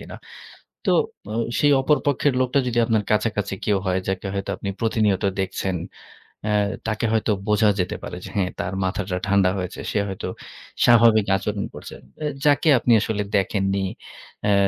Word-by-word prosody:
কিনা। -, -, -9 dB, 0.7 s
তো -, -, +5 dB, 0.4 s
ও -, -, -4 dB, 0.3 s
সেই 145 Hz, -, +4 dB
অপর 150 Hz, +2 st, +3 dB
পক্ষের 145 Hz, 0 st, +2 dB
লোকটা 130 Hz, +2 st, +2 dB
যদি 120 Hz, -1 st, -2 dB
আপনার 110 Hz, -2 st, +1 dB
কাছাকাছি 105 Hz, -2 st, 0 dB
কেউ 105 Hz, -2 st, +2 dB
হয় 95 Hz, 0 st, +1 dB
যাকে 95 Hz, +1 st, -2 dB
হয়তো 100 Hz, 0 st, -3 dB
আপনি 100 Hz, -, -5 dB
প্রতিনিয়ত 110 Hz, -3 st, +1 dB, 0.2 s
দেখছেন, 95 Hz, 0 st, -2 dB, 0.7 s
আ -, -, +1 dB, 0.4 s
তাকে 110 Hz, +1 st, -1 dB
হয়তো 110 Hz, 0 st, +1 dB, 0.2 s
বোঝা 105 Hz, 0 st, +4 dB
যেতে 90 Hz, -, -1 dB
পারে -, -, -6 dB
যে -, -, -7 dB
হ্যাঁ, 95 Hz, -2 st, +1 dB
তার 90 Hz, -, -3 dB
মাথাটা 95 Hz, -1 st, -2 dB
ঠান্ডা 100 Hz, -2 st, +4 dB
হয়েছে 90 Hz, -1 st, -5 dB
সে 105 Hz, -, +1 dB
হয়তো 95 Hz, -1 st, -5 dB, 0.6 s
স্বাভাবিক 115 Hz, -3 st, +6 dB
আচরণ 100 Hz, 0 st, -3 dB
করছে। -, -, -9 dB, 0.3 s
এ -, -, -1 dB, 0.2 s
যাকে 145 Hz, +2 st, +4 dB
আপনি 120 Hz, -, +1 dB
আসলে 105 Hz, -1 st, -1 dB, 0.2 s
দেখেননি, 95 Hz, 0 st, 0 dB, 0.6 s
অ্যা 105 Hz, -, +3 dB
105 Hz, 165 wpm, -23 LUFS, 95-115 Hz, 0.7 s, স্বাভাবিক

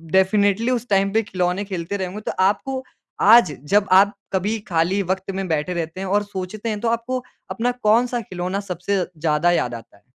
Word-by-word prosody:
Definitely 200 Hz, +4 st, +3 dB
उस 245 Hz, -1 st, -1 dB
time 195 Hz, 0 st, +2 dB
पे 225 Hz, -, +3 dB
खिलौने 180 Hz, 0 st, -1 dB
खेलते 190 Hz, 0 st, -4 dB
रहें 190 Hz, -2 st, -2 dB
होंगे, 205 Hz, +4 st, -7 dB
तो -, -, -3 dB
आपको 260 Hz, +7 st, 0 dB, 0.4 s
आज 220 Hz, -5 st, +7 dB, 0.2 s
जब 205 Hz, -1 st, +4 dB
आप 195 Hz, +2 st, +6 dB, 0.2 s
कभी 205 Hz, +4 st, 0 dB
खाली 175 Hz, +3 st, +1 dB
वक़्त 190 Hz, +1 st, -7 dB
में 195 Hz, 0 st, -3 dB
बैठे 160 Hz, +2 st, -1 dB
रहते 170 Hz, 0 st, -4 dB
हैं 195 Hz, -, -4 dB
और 205 Hz, +2 st, +2 dB
सोचते 200 Hz, +2 st, -5 dB
हैं, 210 Hz, -1 st, -2 dB
तो 235 Hz, -, -2 dB
आपको 240 Hz, +2 st, -2 dB, 0.3 s
अपना 245 Hz, +2 st, 0 dB
कौन-सा 240 Hz, +3 st, +3 dB
खिलौना 185 Hz, -1 st, -4 dB
सबसे 195 Hz, 0 st, -2 dB, 0.2 s
ज़्यादा 155 Hz, +2 st, +2 dB
याद 125 Hz, -8 st, 0 dB
आता 115 Hz, -3 st, -12 dB
है? 100 Hz, -, -29 dB
195 Hz, 195 wpm, -21 LUFS, 180-215 Hz, 0.4 s, आज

